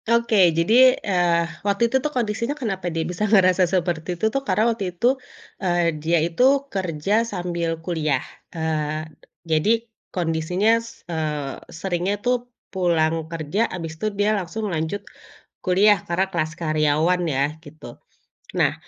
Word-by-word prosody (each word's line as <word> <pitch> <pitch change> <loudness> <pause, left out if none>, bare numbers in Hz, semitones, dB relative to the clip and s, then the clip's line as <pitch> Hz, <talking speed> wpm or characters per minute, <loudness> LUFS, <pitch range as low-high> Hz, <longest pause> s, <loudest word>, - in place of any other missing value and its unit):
Oke, 230 -6 +4
jadi, 245 +9 +6
eee, 175 -3 +2 0.2
waktu 200 +2 0
itu 235 +3 +2
tuh 300 - -1
kondisinya 235 +3 -1
kenapa 195 -9 -3
dia 165 -1 -2
bisa 180 +5 -3
ngerasa 185 -3 +5
seperti 175 -1 -1
itu 220 - -1
tuh, 275 - 0
karena 220 -5 +1
waktu 215 -3 -4
itu, 235 - +2 0.5
eee, 175 -3 +1
dia 165 +2 +2
itu 170 +6 -3 0.3
kerja 190 +2 0
sambil 175 -6 -3 0.2
kuliah. 155 -6 0 0.3
Eee, 155 -1 -2 0.4
jadi 205 +9 +2 0.2
kondisinya, 180 +6 +1
s 230 0 -13
eee, 150 -4 -3
seringnya 180 +3 -2
tuh 245 0 0 0.2
pulang 165 -3 +1
kerja, 165 +7 -1
abis 165 -3 -5
itu - - -1
dia 205 +1 +2
langsung 205 +2 -3
lanjut 160 +5 -2 0.6
kuliah, 200 +3 +5
karena 175 +3 +1
kelas 155 -2 -1
karyawan 155 +3 +2
ya, 135 - +2 0.2
gitu. 150 +1 -12 0.7
Nah, - - +3
180 Hz, 140 wpm, -23 LUFS, 160-210 Hz, 0.7 s, jadi